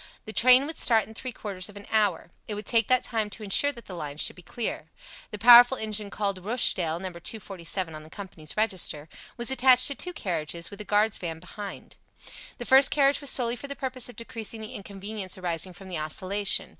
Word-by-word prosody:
The 215 - -8
train 255 +4 +6
would 315 +2 -6
start 225 -3 +3
in 220 - -12
three 255 +3 -6
quarters 200 -4 -5
of 205 - -12
an 205 - -11
hour. 205 -6 +1 0.2
It 210 - -4
would 210 0 -7
take 225 -1 +3
that 255 -1 +3
time 220 -3 -1
to 215 +2 -8
insure 210 +8 +4
that 235 -3 -13
the 185 - -9
line 150 -4 -6
should - - 0
be 180 - -13
clear. 230 +6 -5 0.4
The 210 - -6
powerful 245 +3 +8
engine 215 -1 -2
called 200 -2 -2
Rochdale 185 -7 +1
(No. 190 +1 -4
247 180 -1 -4
on 155 - -8
the 155 - -14
company's 170 -4 -9
register) 185 -8 -1 0.3
was 240 +2 0
attached 255 -1 +5
to - - -2
two 360 +6 -2
carriages, 170 - -3
with 200 +1 -8
a - - -8
guard's 210 +1 +2
van 165 -3 -5
behind. 200 +3 -9 0.6
The 240 - -7
first 265 +2 +6
carriage 280 0 +3
was 285 - +2
solely 240 -2 +1
for 280 - -8
the 280 - -5
purpose 255 -2 -2
of 245 - -11
decreasing 230 -1 -5
the 215 - -7
inconvenience 200 -1 -6
arising 180 0 -3
from 195 +1 -13
the 175 -4 -4
oscillation. 190 +6 0
210 Hz, 215 wpm, -26 LUFS, 185-240 Hz, 0.6 s, powerful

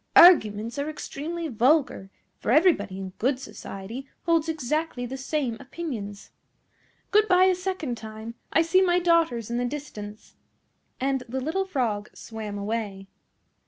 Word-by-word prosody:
"Arguments 230 - +7
are 285 +2 -1
extremely 320 +2 -5
vulgar, 255 -5 +2 0.3
for - - -4
everybody 245 - +4
in 190 -1 -5
good 260 +3 +2
society 230 +1 -8 0.2
holds 330 -1 +2
exactly 305 -3 -1
the 255 +2 -5
same 265 -3 -2
opinions. 255 -9 -6 0.8
Good 425 0 +5
bye 365 -1 +5
a 375 0 +5
second 365 -9 -3
time; 220 +1 -8 0.2
I 325 - +4
see 370 +3 +4
my 355 -2 +4
daughters 330 -11 +2
in 240 - 0
the 245 - 0
distance;" 215 -7 -7 0.7
and 270 0 0
the 260 +2 -2
little 325 +9 -1
Frog 235 - -1
swam 215 -2 -6
away. 200 -2 -4
265 Hz, 140 wpm, -26 LUFS, 220-325 Hz, 0.8 s, Arguments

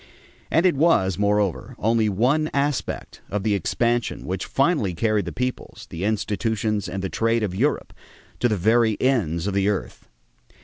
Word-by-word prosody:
And 165 +3 +2
it 185 - +5
was, 100 - +2
moreover, 100 -8 0
only 110 0 +2
one 130 +10 +1
aspect 140 -1 -2
of 105 -1 -2
the 105 -1 +1
expansion 120 +5 -1
which 95 0 -3
finally 135 - +1
carried 110 0 +1
the 85 - -4
peoples, 125 0 -4
the 85 +4 -4
institutions, 105 -1 -1
and 95 +2 -4
the - - 0
trade 115 +2 +1
of 100 -4 -2
Europe 135 +11 -1 0.5
to 120 - +2
the 105 - 0
very 110 +3 +2
ends 95 - +1
of 100 - -1
the 100 +1 +2
earth. 105 - -4
110 Hz, 165 wpm, -23 LUFS, 95-120 Hz, 0.5 s, it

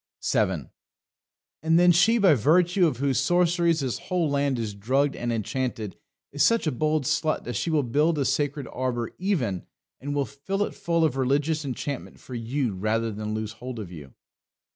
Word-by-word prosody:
7. - - 0 0.9
And 160 +1 +3
then 175 0 +6
she, 180 +8 +4
by 195 -7 +5
virtue 175 - +3
of 145 - -2
whose 135 -1 +1
sorceries 170 +1 +2
this 125 -6 -2
whole 180 -3 -1
land 140 -2 +1
is 110 -3 -3
drugged 130 +8 0
and 120 0 -2
enchanted, 115 -2 -3 0.4
is 145 - -3
such 230 - +4
a 155 - +1
bold 155 +3 0
slut 155 +1 0
that 120 - -5
she - - -1
will 155 -3 +2
build 150 +7 +1
a 140 - +1
Sacred 145 -1 -1
Arbour 120 -2 -2
even, 135 - -1 0.3
and 145 +2 -4
will 140 -1 +1
fill 175 +10 -3
it - - -4
full 170 -1 0
of 135 -4 -1
religious 145 +4 +1
enchantment 140 +1 -5
for 130 - -11
you 120 0 -2
rather 110 +4 -1
than 105 +1 -4
lose 110 -1 -3
hold 125 +3 -8
of 100 -5 -7
you. 75 -6 -11
140 Hz, 185 wpm, -26 LUFS, 120-160 Hz, 0.9 s, then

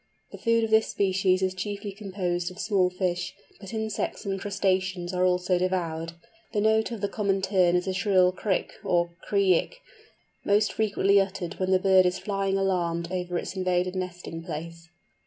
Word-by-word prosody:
The - - -10
food 230 0 +2
of 225 - -2
this 220 0 +4
species 190 -1 +1
is 185 0 +1
chiefly 200 +2 -4
composed 185 -3 -3
of 180 - -13
small 195 -3 +2
fish, 180 -1 -2 0.2
but 195 -2 -9
insects 220 -1 -3
and 195 -1 -2
crustaceans 190 -2 -1
are 180 0 +1
also 180 0 +2
devoured. 170 -3 -2 0.4
The 210 - +1
note 220 +1 +3
of 230 -4 -6
the 200 - +1
Common 200 -1 0
Tern 185 -3 +3
is 180 - +1
a 190 - -1
shrill 185 -2 +3
krick 190 0 -1
or 175 -1 +1 0.2
kree 195 -4 +4
ick, - - -14 0.6
most 205 +1 +2
frequently 200 -2 +3
uttered 190 -2 -4
when 185 0 0
the 190 - +5
bird 185 -1 +5
is 180 +1 -1
flying 195 -1 -1
alarmed 170 -3 -1
over 180 -1 -2
its 185 - -5
invaded 185 0 0
nesting 180 -2 -5
place. 165 0 -7
185 Hz, 175 wpm, -26 LUFS, 180-200 Hz, 0.6 s, the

